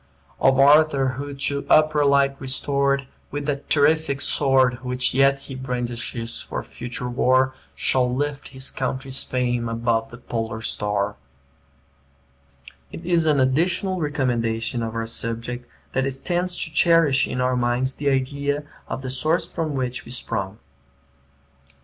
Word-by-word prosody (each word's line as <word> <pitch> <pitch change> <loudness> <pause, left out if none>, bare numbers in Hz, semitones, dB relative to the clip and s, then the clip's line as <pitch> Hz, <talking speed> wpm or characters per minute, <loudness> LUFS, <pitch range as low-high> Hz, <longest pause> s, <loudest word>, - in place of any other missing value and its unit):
"Of 135 0 +4
Arthur, 140 -1 +5
who, 140 +2 -5
to 140 +1 -1
upper 155 -1 +5
light 140 -1 +3
restored, 140 0 0 0.2
With 145 0 -4
that 140 -1 -3
terrific 145 -1 +3
sword, 130 -3 +2
Which 125 0 0
yet 135 +1 +3
he 140 - -9
brandishes 120 -2 -4
for - - -5
future 120 0 -6
war, 130 +2 +2 0.2
Shall 125 -1 +1
lift 145 +2 -2
his 130 0 -2
country's 130 0 -3
fame 120 -2 -1
above 115 0 0
the 120 - -11
polar 115 -2 -4
star." 105 -2 -1 1.5
[Footnote: - - -31 0.3
Wordsworth] 170 - -8
It 175 - -1
is 165 -2 +3
an 150 -2 +3
additional 175 +8 +1
recommendation 120 -6 -1
of 115 0 -4
our 115 0 -1
subject, 115 +2 -4 0.2
that 135 0 +1
it 135 0 -7
tends 180 0 +1
to 160 - -7
cherish 165 -5 +4
in 125 - -3
our 125 0 +1
minds 125 +2 0
the 145 +1 -1
idea 140 +2 -1 0.2
of 135 - -5
the 130 - -3
source 155 +6 +1
from 160 -4 -3
which 125 -1 -2
we - - -13
sprung. 105 -5 -3
130 Hz, 150 wpm, -23 LUFS, 120-145 Hz, 1.5 s, Arthur